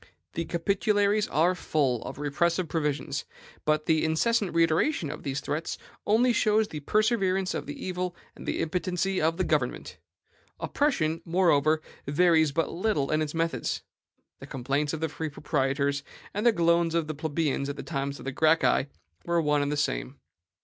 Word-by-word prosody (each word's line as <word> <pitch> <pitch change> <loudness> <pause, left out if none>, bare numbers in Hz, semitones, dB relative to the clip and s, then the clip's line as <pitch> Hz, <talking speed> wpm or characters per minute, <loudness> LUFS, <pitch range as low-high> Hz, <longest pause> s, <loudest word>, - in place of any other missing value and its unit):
The 165 - -2
Capitularies 205 +4 +1
are 165 +5 +3
full 140 -8 0
of - - -6
repressive 165 +5 0
provisions; 150 -2 -2 0.4
but 155 0 +1
the 160 -1 +2
incessant 200 +5 +1
reiteration 165 - +2
of - - -7
these 140 -1 -3
threats 155 +3 -3 0.3
only 235 +4 +4
shows 215 -1 +3
the 155 - -6
perseverance 195 - +1
of - - -4
the 145 - -6
evil 180 -1 -3 0.2
and - - -11
the - - -1
impotency 180 +3 -1
of 165 +2 +1
the 185 - +1
government. 150 -7 -1 0.6
Oppression, 165 - 0
moreover, 155 -3 +3 0.2
varies 160 0 +4
but 165 +3 0
little 175 -7 0
in 155 0 +2
its 155 +1 -3
methods. 165 0 -1 0.6
The - - -10
complaints 140 +3 -1
of 160 - -4
the 160 - +1
free 160 +1 -4
proprietors, 140 0 0 0.3
and 210 +4 +1
the - - +7
groans 170 -3 +2
of 165 -2 +1
the 155 - -4
plebeians 150 -2 -1
at 140 - -3
the - - -7
time 140 -3 -2
of 140 - -8
the 135 - -3
Gracchi, 155 -1 +3 0.3
were 170 0 +1
one 150 -2 +2
and 145 0 -1
the 150 - -1
same. - - -2
160 Hz, 170 wpm, -27 LUFS, 145-180 Hz, 0.6 s, the